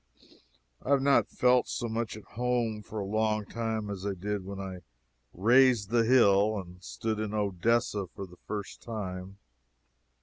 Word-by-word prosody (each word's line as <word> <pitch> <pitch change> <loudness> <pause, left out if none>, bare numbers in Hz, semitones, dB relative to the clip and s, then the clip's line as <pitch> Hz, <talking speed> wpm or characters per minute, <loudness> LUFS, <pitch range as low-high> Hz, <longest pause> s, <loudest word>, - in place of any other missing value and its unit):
I - - -7
have 140 -1 +4
not 140 0 +4
felt 125 0 +3
so 120 - -3
much 115 -1 -3
at 110 - -11
home 120 -2 -1
for 110 +1 -9
a 100 - -3
long 110 +1 0
time 110 -1 -3
as 95 -2 -6
I 100 -1 -2
did 100 +2 -3
when 100 +1 -7
I 95 -2 -6 0.5
"raised 120 +1 +4
the 115 -1 +3
hill" 110 -3 +4
and 90 -2 -8
stood 110 +1 -3
in 110 0 -3
Odessa 105 +1 0
for 100 +3 -8
the 90 -1 -16
first 105 -2 -5
time. 95 -4 -6
105 Hz, 165 wpm, -29 LUFS, 100-115 Hz, 0.5 s, have